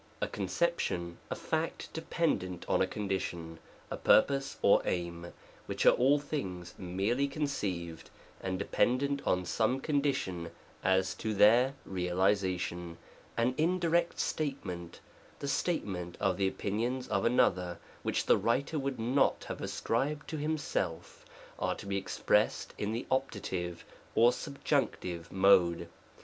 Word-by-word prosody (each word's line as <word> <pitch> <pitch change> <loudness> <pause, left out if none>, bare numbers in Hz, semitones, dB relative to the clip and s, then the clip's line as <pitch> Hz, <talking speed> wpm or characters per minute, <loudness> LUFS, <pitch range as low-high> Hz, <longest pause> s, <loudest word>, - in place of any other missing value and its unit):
A - - 0
conception, 90 - -1
a - - -2
fact 160 +1 -3
dependent 155 - -1
on - - +2
a 95 - +3
condition, 95 -5 -3 0.3
a - - -2
purpose 135 +4 +3
or 100 - +6
aim, 85 -1 -3 0.4
which - - -1
are - - +9
all 135 +4 +4
things 95 - -4
merely 100 +9 0
con 150 +2 -3
ceived, 90 - -3 0.4
and 95 -1 -2
dependent 140 +7 +1
on 90 0 +2
some 115 +8 +1
condition 135 - -1 0.3
as 95 0 +2
to 110 -1 -3
their 120 +7 +5
realization, 90 -2 0 0.4
an 120 +2 +2
indirect 170 0 +2
statement, 95 - -3 0.4
the 140 - -5
statement 95 - -2
of 95 -1 +2
the 95 0 +2
opinions 120 +7 -2
of 100 - +1
another 90 -7 +2 0.2
which - - -1
the - - +5
writer 140 +6 0
would 135 -1 -2
not 125 +5 +2
have - - -5
ascribed 145 +6 -1
to 160 - -3
himself, 145 - -2 0.4
are - - 0
to - - -9
be 100 0 -1
expressed 95 - +1
in 105 +1 -1
the 115 +2 -3
Opt. 130 -8 -1 0.6
or 120 +2 +6
Subjunctive 120 - -2
Mode. 90 -3 +4
105 Hz, 130 wpm, -31 LUFS, 90-140 Hz, 0.6 s, are